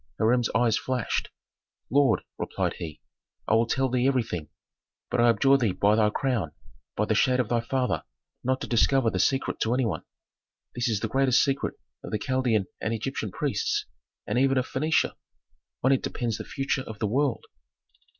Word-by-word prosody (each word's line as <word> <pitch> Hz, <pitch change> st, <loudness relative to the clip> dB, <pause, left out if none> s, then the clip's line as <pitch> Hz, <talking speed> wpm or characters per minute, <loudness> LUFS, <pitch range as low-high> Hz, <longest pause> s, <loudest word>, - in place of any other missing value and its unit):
Hiram's 120 Hz, +1 st, +2 dB
eyes 115 Hz, -2 st, +3 dB
flashed. 130 Hz, -4 st, -2 dB, 0.6 s
"Lord," 135 Hz, -4 st, +3 dB, 0.2 s
replied -, -, -1 dB
he, 80 Hz, -3 st, -7 dB, 0.5 s
"I -, -, +2 dB
will 115 Hz, +1 st, +4 dB
tell 135 Hz, +2 st, +1 dB
thee 125 Hz, 0 st, +1 dB
everything, 115 Hz, -, -1 dB, 0.6 s
but -, -, +2 dB
I 120 Hz, -, +5 dB
abjure 135 Hz, +4 st, +4 dB
thee 110 Hz, -7 st, +1 dB
by 105 Hz, +3 st, +3 dB
thy 110 Hz, -1 st, +4 dB
crown, 115 Hz, -, -1 dB, 0.4 s
by -, -, +1 dB
the -, -, +1 dB
shade 130 Hz, 0 st, +3 dB
of 125 Hz, -, 0 dB
thy 120 Hz, -, +2 dB
father, 130 Hz, +1 st, -1 dB, 0.4 s
not 130 Hz, +1 st, 0 dB
to -, -, -4 dB
discover 120 Hz, 0 st, +3 dB
the 95 Hz, -, -2 dB
secret 135 Hz, +8 st, +1 dB
to 115 Hz, +2 st, +1 dB
any 130 Hz, -1 st, +1 dB
one. 110 Hz, -, -2 dB, 0.7 s
This 120 Hz, 0 st, -1 dB
is 110 Hz, -3 st, 0 dB
the 110 Hz, -, 0 dB
greatest 130 Hz, +2 st, +3 dB
secret 135 Hz, -1 st, -1 dB, 0.3 s
of -, -, -6 dB
the 105 Hz, -, -1 dB
Chaldean 130 Hz, -6 st, +1 dB, 0.2 s
and 115 Hz, +1 st, -1 dB
Egyptian 110 Hz, -1 st, -3 dB
priests, -, -, -1 dB, 0.4 s
and -, -, 0 dB
even 135 Hz, 0 st, +3 dB
of 130 Hz, -, +1 dB
Phœnicia. 155 Hz, +5 st, +1 dB, 0.7 s
On 130 Hz, -, +4 dB
it 135 Hz, -, +3 dB
depends 115 Hz, -3 st, -3 dB
the -, -, -6 dB
future 135 Hz, -1 st, -1 dB
of 110 Hz, -, -7 dB
the 105 Hz, -, -1 dB
world." 130 Hz, +3 st, 0 dB
120 Hz, 180 wpm, -27 LUFS, 110-135 Hz, 0.7 s, I